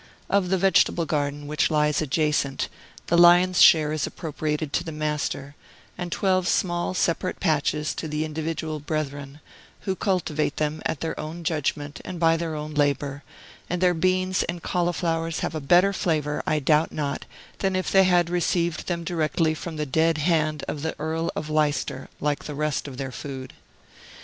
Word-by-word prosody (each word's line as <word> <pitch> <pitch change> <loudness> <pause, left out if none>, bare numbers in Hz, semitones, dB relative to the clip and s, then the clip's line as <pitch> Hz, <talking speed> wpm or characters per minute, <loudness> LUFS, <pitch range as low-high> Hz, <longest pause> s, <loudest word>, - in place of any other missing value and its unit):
Of 195 -2 +2
the 190 - +2
vegetable 185 -2 +3
garden, 145 -1 -2
which 150 +1 +1
lies 150 -1 +2
adjacent, 150 -2 0 0.4
the 170 - +3
lion's 175 +1 +6
share 155 -2 +7
is 155 -2 -1
appropriated 155 -2 -3
to - - +1
the 160 - -6
Master, 150 -2 -3 0.4
and 175 -1 -5
twelve 185 -1 +1
small, 175 0 0
separate 170 -2 0
patches 150 0 0
to 160 - -5
the 150 +1 -2
individual 155 0 -3
brethren, 145 -1 -4 0.4
who 190 -2 -2
cultivate 170 -7 -1
them 155 +1 -1
at 155 - -4
their 165 - -3
own 160 +3 -6
judgment 150 -2 -2
and 185 -2 -6
by 165 -1 +4
their 165 -1 -3
own 150 0 -5
labor; 145 -1 0 0.5
and 180 - -1
their 180 0 +4
beans 185 +2 +1
and 170 0 -4
cauliflowers 165 -2 -1
have - - -2
a 155 - -3
better 180 +7 +4
flavor, 150 -5 0
I 155 - +2
doubt 150 +2 +2
not, 145 -2 -3 0.3
than 190 -1 0
if 185 - -1
they 190 -1 +6
had 175 -2 +4
received 175 -1 0
them 170 -2 -2
directly 160 -1 0
from 160 +1 -6
the 150 0 -2
dead 160 +3 +2
hand 155 -1 +1
of 145 - -4
the 160 +1 -2
Earl 160 +2 -1
of 150 - -3
Leicester, 150 -3 0
like 145 -1 -1
the 150 - -5
rest 150 0 -1
of 130 -3 -8
their 135 -1 -4
food. 130 -1 -7
155 Hz, 175 wpm, -25 LUFS, 150-175 Hz, 0.5 s, share